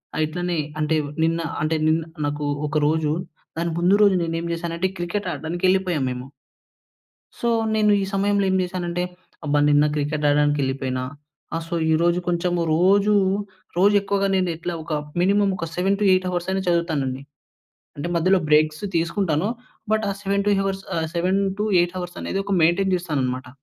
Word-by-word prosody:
ఆహ్, 155 - +1
ఇట్లనే 175 +1 -2 0.2
అంటే 155 +1 +1 0.3
నిన్న 165 +1 +1 0.2
అంటే, 155 +1 +1
నిన్ 160 +1 +3 0.3
నాకూ 145 0 -3 0.2
ఒక 150 - -1
రోజు 155 -1 +1 0.4
దాని 170 0 -1
ముందు 180 +3 +4
రోజు 200 -2 +5
నేనేం 165 0 -2
చేశానంటే, 170 +2 -2
క్రికెట్ 175 +4 -3
ఆడడానికి 170 +3 -5
యెళ్ళిపోయాము 185 -6 +1
మేము. 125 0 -6 1.1
సో, 235 - -1 0.3
నేను 215 -1 +3
ఈ - - 0
సమయంలో 200 0 +2
ఏం - - +1
చేశానంటే, 175 -1 -3 0.4
అబ్బా! 145 0 +2
నిన్న 145 0 +5
క్రికెట్ 150 0 -2
ఆడడానికి 145 0 +3
యెళ్ళిపోయినా, 130 -1 -2 0.5
ఆహ్, 165 - -3
సో, 170 - -3 0.2
ఈరోజు 170 +2 +2
కొంచము 175 0 0
రోజూ 200 +4 +4 0.6
రోజు 200 +3 +5
ఎక్కువగా 200 0 0
నేమెట్లా 175 -2 -1
ఒక 160 - -7 0.3
మినిమమ్ 200 +1 +3 0.2
7-8 190 0 +2
హవర్సయినా 190 +2 -1
చదువుతానండి. 150 -6 0 0.7
అంటే, 145 +4 -4
మధ్యలో 185 +3 +3
బ్రేక్స్ 155 +2 +3
తీసుకుంటాను, 170 +1 0 0.4
బట్, 220 -1 +1
ఆ - - 0
7 200 0 0
టూ 205 - +4
హవర్స్ 195 0 -2
ఆహ్, 160 -1 -1
7-8 190 0 +1
హవర్సనేది 180 +2 -4
ఒక 200 0 -1
మెయింటెయిన్ 185 +3 +3
చేస్తాననమాట. 130 -7 -2
175 Hz, 145 wpm, -23 LUFS, 155-195 Hz, 1.1 s, రోజు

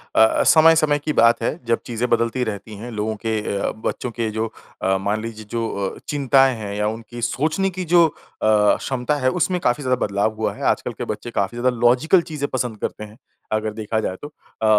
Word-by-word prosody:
अ 110 - +7
अ, - - +2
समय-समय 155 -2 +5
की 150 +1 -2
बात 115 -3 +4
है 145 - 0
जब 115 0 +1
चीज़ें 120 0 -2
बदलती 115 +2 +1
रहती 105 -1 -5
हैं, 120 +4 -7
लोगों 110 0 -2
के 110 -1 +1 0.2
अ, - - -1
बच्चों 125 - -2
के 115 -1 -2
जो 110 +1 -1 0.4
अ, 95 0 +2
मान 105 +3 -1
लीजिए 110 -1 -7
जो 115 -1 -1 0.3
अ, - - -13
चिंताएँ 135 -2 +3
हैं 100 -1 -5
या 105 0 0
उनकी 115 +2 -6
सोचने 155 - 0
की 185 0 -5
जो 170 0 +5
अ, - - -8 0.3
क्षमता 110 +6 +2
है 130 - +2
उसमें 180 +4 0
काफ़ी 125 +4 +1
ज़्यादा 125 0 +1
बदलाव 100 +2 0
हुआ 110 - -1
है। - - -8
आजकल - - -6
के - - -5
बच्चे 120 - -5
काफ़ी 100 +4 -1
ज़्यादा 125 0 +1
लॉजिकल 125 +10 +4
चीज़ें 150 -3 -4
पसंद 125 -4 -2
करते - - -4
हैं। 105 +1 -12 0.4
अगर 110 0 -1
देखा 110 0 -2
जाए 95 - -2
तो। 145 - -6
अ, 145 -6 -9
120 Hz, 215 wpm, -21 LUFS, 110-140 Hz, 0.4 s, अ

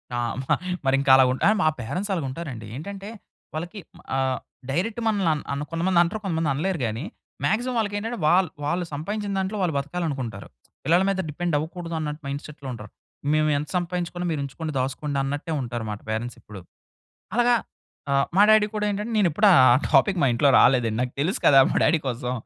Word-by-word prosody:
ఆ! - - -1 0.2
మ - - -7 0.4
మరింక 135 +1 +2
అలా 130 - +7
ఉ - - +1 0.3
మా - - +3
పేరెంట్స్ 180 - -3
అలగుంటారండి. 135 - -5
ఏంటంటే 195 +7 -7 0.4
వాళ్ళకి 175 +6 -5 0.4
ఆహ్, 130 -1 0 0.3
డైరెక్ట్ 210 +9 -1
మనల్ని 200 -6 +2
అన్ 150 - -4
అన్ 140 +1 -3
కొంతమంది 170 +2 +2
అంటారు 180 +6 -3
కొంతమంది 165 -5 0
అనలేరు 170 +5 -1
గాని, 110 +5 -3 0.4
మాక్సిమం 245 +3 0
వాళ్ళకి 205 -2 -1
ఏంటంటే 225 +3 -4
వాళ్ళు, 180 0 +4 0.2
వాళ్ళు 175 +4 -1
సంపాదించిన 200 +7 -3
దాంట్లో 190 +3 -2
వాళ్ళు 175 -3 +1
బతకాలి 150 +5 -3
అనుకుంటారు. 120 -8 -5 0.4
పిల్లల 170 +6 +3
మీద 195 -1 -1
డిపెండ్ 170 +2 -3
అవ్వకూడదు 165 +2 -5
అన్నట్టు 150 0 -4
మైండ్‌సెట్‌లో 140 0 -7
ఉంటారు. 105 -3 -10 0.4
మేము 155 0 +2
ఎంత 145 +1 -3
సంపాదించుకున్నా 175 0 -3
మీరు 150 - -2
ఉంచుకోండి. 155 +3 -5
దాసుకోండి 140 +2 -2
అన్నట్టే 145 +4 -3
ఉంటారనమాట 115 -4 -4
పేరెంట్స్ 115 +2 -3
ఇప్పుడు. 105 -2 -11 0.8
అలాగా 240 0 +4 0.6
ఆహ్, 140 0 +3
మా 195 - +6
డాడీ 215 -1 +6
కూడా 210 0 0
ఏంటంటే 210 +3 -3
నేను 205 -4 +4
ఎప్పుడు 205 +7 +3
ఆ - - +7 0.2
ఆ - - +5 0.2
టాపిక్ 160 +6 +4
మా 140 - +4
ఇంట్లో 130 +4 +3
రాలేదండి 120 -4 +3
నాకు 125 0 -2
తెలుసు 160 +7 0
కదా! 135 -1 +8
మా - - -2
డాడీ 165 - +3
కోసం 125 0 -3
155 Hz, 180 wpm, -24 LUFS, 135-190 Hz, 0.8 s, కదా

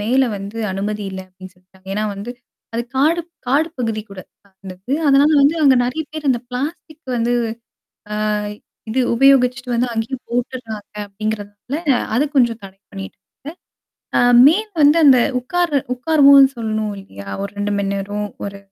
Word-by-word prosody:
மேல 255 +6 +2
வந்து 200 +3 -7
அனுமதி 205 +2 -3
இல்ல 190 - -6
அப்படின்னு 185 0 -14
சொல்லிட்டாங்க. 185 +1 -26
ஏன்னா, 210 +1 -1
வந்து 205 +4 -7 0.4
அது 235 - -1
காடு 315 +5 +3 0.3
காடு 295 +5 +2
பகுதி 225 -3 -2
கூட, 195 - -8 0.4
அந்த 190 -1 -7
இது. 260 - -1
அதனால 280 +2 +5
வந்து 285 +3 +4
அங்கே 270 -3 +6
நிறைய 255 +6 -2
பேர் 310 -2 -3
அந்த 240 -2 0
"பிளாஸ்டிக்" 300 +5 -6
வந்து 235 +1 0 1.0
அ - - +1 0.6
இது 255 +4 +1
உபயோகிச்சிட்டு 250 -1 +3
வந்து 240 +1 +1
அங்கேயே 225 +4 -2
போட்டுடுறாங்க 235 -4 -5
அப்படிங்கிறதனால 210 +4 -5 0.4
அது 265 +6 +3
கொஞ்சம் 235 -4 +3
தடை 195 0 -12
பண்ணியிருக்காங்க. 195 -1 -8 1.0
ஆ - - +4 0.3
மே 315 +5 +6 0.2
வந்து 290 +2 +6
அந்த 270 -3 +7 0.2
உட்காரு 330 +3 0 0.2
உட்காருவோம்னு 280 0 +6
சொல்லணும் 215 -2 -2
இல்லையா? 100 - -12 0.2
ஒரு 200 - -4
2 205 0 -1
மணி 200 -1 -1
நேரம், 205 +1 -3 0.2
ஒரு 200 0 -6
235 Hz, 150 wpm, -19 LUFS, 205-275 Hz, 1.0 s, அந்த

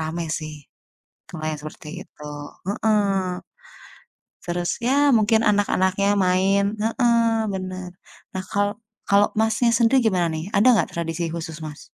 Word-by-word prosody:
rame 160 +2 -3
sih, 155 -1 -7 0.7
kalau 160 -3 -8 0.2
seperti 155 0 -10 0.2
itu. 150 - -14 0.4
Heeh. 200 -4 0 1.0
Terus, 175 0 -2
ya 275 +2 +3
mungkin 220 0 +3
anak-anaknya 200 -1 +2
main. 195 +2 +2
Heeh, 230 -1 +2
benar. 185 -1 -5 0.4
Nah 185 - -3
kalau 205 +1 0 0.3
kalau 200 +1 +4
Masnya 225 +2 +2
sendiri 245 +2 +4
gimana 185 -6 +2
nih 160 +5 -5
ada 205 - +4
nggak 180 - +1
tradisi 165 0 -3
khusus, 160 -1 -6
Mas? 150 -1 -8
200 Hz, 125 wpm, -23 LUFS, 175-220 Hz, 1.0 s, kalau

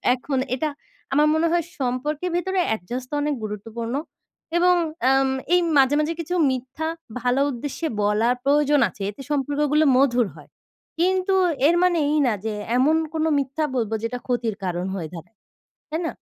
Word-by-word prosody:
এখন 260 +2 -3 0.2
এটা 305 +4 -1 0.4
আমার 300 +2 +4
মনে 330 +1 +2
হয় 345 -1 +2 0.2
সম্পর্কের 285 +7 -1
ভেতরে 380 +1 0 0.2
adjust 245 +7 -6
অনেক 295 0 0
গুরুত্বপূর্ণ। 225 +3 -5 0.6
এবং 360 +1 +5 0.3
অ্যাম 270 +1 +4 0.3
এই 360 - +6 0.2
মাঝে, 275 +1 +5
মাঝে 305 +2 0
কিছু 345 +2 -5 0.2
মিথ্যা 260 +5 -4 0.3
ভালো 250 +3 +2
উদ্দেশ্যে 285 +6 -4
বলা 210 +3 +2
প্রয়োজন 290 +1 +3
আছে, 200 - -15
এতে 210 +6 -9
সম্পর্কগুলো 295 +2 +1
মধুর 245 -4 +3
হয়। - - -15 0.5
কিন্তু 370 +2 +2 0.3
এর 340 - +4
মানে 360 -2 +3
এই 305 - +2
না 235 - +2
যে 220 - -1 0.2
এমন 290 +5 +4 0.2
কোন 315 0 0 0.2
মিথ্যা 275 +3 -2
বলব 225 -3 -1
যেটা 245 +2 -2
ক্ষতির 235 -4 -1
কারণ 180 0 -2
হয়ে 165 -4 -5
দাঁড়ায়, 175 +6 -11 0.5
তাই 320 +2 -1
না? - - -4
270 Hz, 160 wpm, -23 LUFS, 235-310 Hz, 0.6 s, এই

